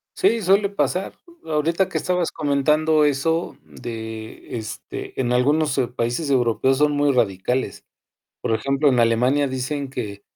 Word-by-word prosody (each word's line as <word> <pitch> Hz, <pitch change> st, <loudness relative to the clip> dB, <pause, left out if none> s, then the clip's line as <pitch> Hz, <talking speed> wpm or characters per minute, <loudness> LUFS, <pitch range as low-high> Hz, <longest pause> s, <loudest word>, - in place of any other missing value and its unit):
sí, 305 Hz, -, +2 dB
suele 195 Hz, +2 st, +3 dB
pasar. 195 Hz, -1 st, -1 dB, 0.3 s
Ahorita 165 Hz, +4 st, 0 dB
que -, -, -2 dB
estabas 180 Hz, -2 st, 0 dB
comentando 150 Hz, +1 st, +2 dB
eso 160 Hz, +4 st, 0 dB
de 110 Hz, 0 st, -8 dB
este, 110 Hz, +3 st, -7 dB
en 125 Hz, -1 st, +1 dB
algunos 145 Hz, +3 st, +2 dB, 0.2 s
países 120 Hz, +6 st, -1 dB
europeos 130 Hz, +1 st, +2 dB
son 150 Hz, 0 st, +3 dB
muy 145 Hz, 0 st, +2 dB
radicales. 100 Hz, -1 st, -1 dB, 0.6 s
Por -, -, -1 dB
ejemplo, 140 Hz, +5 st, +1 dB
en 125 Hz, -3 st, +3 dB
Alemania 125 Hz, +5 st, +3 dB
dicen 130 Hz, +1 st, -3 dB
que 105 Hz, -6 st, -6 dB
140 Hz, 135 wpm, -22 LUFS, 120-155 Hz, 0.6 s, suele